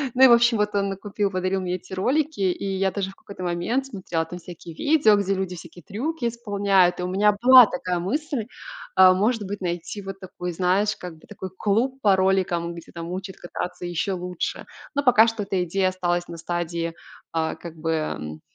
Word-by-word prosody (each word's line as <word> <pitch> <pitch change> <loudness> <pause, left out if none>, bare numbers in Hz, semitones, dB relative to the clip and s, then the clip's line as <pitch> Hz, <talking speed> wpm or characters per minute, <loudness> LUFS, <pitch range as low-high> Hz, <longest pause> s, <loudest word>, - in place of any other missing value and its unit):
Ну, 260 - +5
и, - - +11
в - - +5
общем, 235 0 +5
вот 210 0 +1
он 200 0 +1
накупил, 200 +1 -2
подарил 185 0 -1
мне 180 0 -2
эти 185 +1 -10
ролики, 285 +10 0
и 190 +1 0
я 190 0 +1
даже 190 0 -3
в - - -18
какой-то 200 -2 -10
момент 180 +10 -1
смотрела 180 -8 -3
там 175 +2 -8
всякие 170 -1 -10
видео, 285 - +4
где 200 -1 0
люди 190 -1 -3
всякие 170 +1 -12
трюки 245 +6 -3
исполняют. 200 -6 +2
И - - -2
у - - -1
меня 205 +3 +3
была 255 0 +10
такая 180 -1 -2
мысль, 275 - -2 0.5
э, 185 -1 +9
может 215 +4 +1
быть, 200 0 -5
найти 175 +3 -4
вот 195 0 -7
такой, 180 -2 -6
знаешь, 190 +4 +1
как 175 -3 -8
бы - - -20
такой 190 -2 -7
клуб 240 +8 0
по 200 -4 +5
роликам, 185 -3 +1
где 170 -1 -11
там 170 0 -7
учат 190 +1 -6
кататься 175 0 -6
еще 175 +3 -1
лучше. 180 -1 -4 0.3
Но 285 - +1
пока 230 -4 +6
что 225 -2 -2
эта 195 -2 -1
идея 185 +2 +1
осталась 175 -1 -1
на 170 - -8
стадии, 170 0 -3 0.4
а, 160 -1 -1
как 170 -2 -10
бы, 160 +1 -2
м, 80 - -3
190 Hz, 205 wpm, -24 LUFS, 175-210 Hz, 0.5 s, и